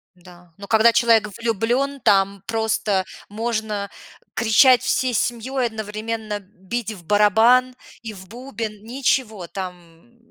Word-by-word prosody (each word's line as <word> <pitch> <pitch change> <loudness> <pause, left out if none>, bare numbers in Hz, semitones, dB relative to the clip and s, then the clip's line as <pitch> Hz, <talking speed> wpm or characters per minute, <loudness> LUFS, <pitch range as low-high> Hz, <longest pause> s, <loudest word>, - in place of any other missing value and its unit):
Да, 175 -1 -18
но 200 0 -10
когда 225 +1 +5
человек 225 -2 +3
влюблен, 235 +5 -1
там 195 -1 +2
просто 220 -4 0 0.2
можно 215 -2 -3 0.4
кричать 245 +3 +5
всей 255 -1 0
семьей, 240 +3 -1
одновременно 220 0 -5
бить 205 +4 -6
в 175 -4 -14
барабан 225 +6 +4 0.3
и 225 -2 -7
в 190 -2 -13
бубен. 225 -3 -7
Ничего, 230 -5 -1
там. 180 +4 -10
220 Hz, 115 wpm, -21 LUFS, 200-235 Hz, 0.4 s, когда